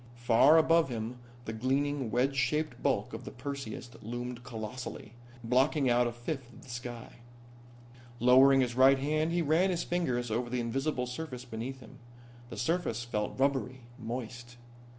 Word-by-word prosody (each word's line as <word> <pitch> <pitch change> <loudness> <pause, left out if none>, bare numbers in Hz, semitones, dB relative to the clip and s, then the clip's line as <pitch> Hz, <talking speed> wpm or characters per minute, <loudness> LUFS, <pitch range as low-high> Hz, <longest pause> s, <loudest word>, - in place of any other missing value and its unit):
Far 120 +6 +5
above 165 -1 +4
him 120 +1 -4 0.3
the 110 - -4
gleaming, 135 +2 0
wedge 125 +5 +1
shaped 150 +4 0
bulk - - 0
of - - -6
the - - -7
Perseus 130 -2 -6
loomed 120 +2 -5
colossally, 110 0 -7 0.3
blocking 130 +3 +2
out 120 0 +3
a - - -2
fifth 120 +1 -6
of - - -15
the 130 - -11
sky. 120 0 -7 1.0
Lowering 130 +3 +6
his 125 -2 0
right 130 +2 +6
hand 155 +4 0
he 170 0 +1
ran 165 +5 +3
his 175 -2 -1
fingers 125 -10 -1
over 120 +2 -1
the 125 0 -1
invisible 125 +3 -1
surface 125 -1 -6
beneath 125 +3 -6
him. 110 - -14 0.5
The - - -8
surface 125 -5 -1
felt 105 0 -3
rubbery, 130 -2 0 0.2
moist. 120 +1 -6
125 Hz, 155 wpm, -31 LUFS, 120-140 Hz, 1.0 s, Lowering